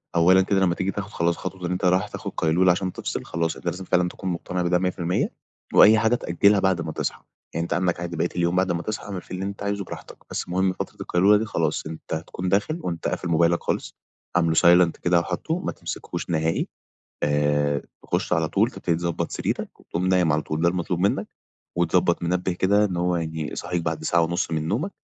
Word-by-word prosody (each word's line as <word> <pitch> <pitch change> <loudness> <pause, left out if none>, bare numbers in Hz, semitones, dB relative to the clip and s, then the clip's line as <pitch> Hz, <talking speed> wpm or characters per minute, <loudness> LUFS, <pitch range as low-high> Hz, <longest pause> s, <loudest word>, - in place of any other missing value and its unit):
أولًا 90 +3 +6
كده 95 +1 +1
لمّا 90 -2 +2
تيجي 95 +2 -1
تاخد 100 0 -5
خلاص، 85 0 0
خطوة 95 -2 -6
إن 90 - -3
أنت 90 +1 -1
رايح 95 +3 +3
تاخد - - -6
قيلولة 90 +3 +4
عشان 90 +1 -1
تفصل، - - -4
خلاص، 85 0 -1
أنت - - -13
لازم 90 +2 -3
فعلًا 90 -1 +2
تكون 95 - -5
مقتنع 90 +1 -3
بده 90 0 +2
100%، 90 -1 0 0.4
وأي 110 +1 +8
حاجة 115 +2 +3
تأجِّلها 100 0 +3
بعد 95 -3 +2
ما - - -4
تصحى، - - -3 0.3
يعني 85 - -1
أنت 85 - -2
عندك 90 +1 0
عادي، 85 0 -4
بقية 85 +2 +1
اليوم 85 0 +1
بعد 95 0 +2
ما 85 - -1
تصحى، 110 +4 -4
اعمل 95 -3 -5
فيه 90 - -8
اللي 95 - -3
أنت 100 0 -5
عايزه، 100 0 -1
براحتك. - - -9
بس - - -3
المهم، 95 +1 +1
فترة - - -6
القيلولة 100 +4 +4
دي، 110 - -1
خلاص 80 -8 -1
أنت 80 0 -7
هتكون 85 +3 -3
داخل 105 - +1
وأنت 85 -2 -3
قافل - - -2
موبايلك 85 +1 +3
خالص، - - -2 0.4
عامله 85 -2 +3
silent 85 0 +6
كده، 90 -1 +3
وحاطُّه، 95 - -2
ما - - -3
تمسكوش - - -6
نهائي. 80 -1 0 0.6
آآ، 75 -1 +1 0.2
تخش - - -2
على 80 -3 +2
طول، 110 +5 +2
تبتدي 85 -9 -1
تضبّط 85 -1 -2
سريرك - - -3
وتقوم 90 +2 -3
نايم 90 -4 +3
على 75 0 +1
طول. 80 +1 -3
ده 85 - +5
المطلوب 90 0 -1
منك. 100 +2 +1 0.5
وتضبِّط 85 0 +2
منبِّه 90 +2 0
كده، 100 +4 +3
إن 90 -4 -1
هو 90 0 +1
يعني 80 -2 -3
يصحِّيك 90 -1 -3
بعد 80 -1 -3
ساعة 85 +2 +3
ونص 85 +1 -1
من 80 -1 -1
نومك، 150 - -1
90 Hz, 215 wpm, -24 LUFS, 85-95 Hz, 0.6 s, وأي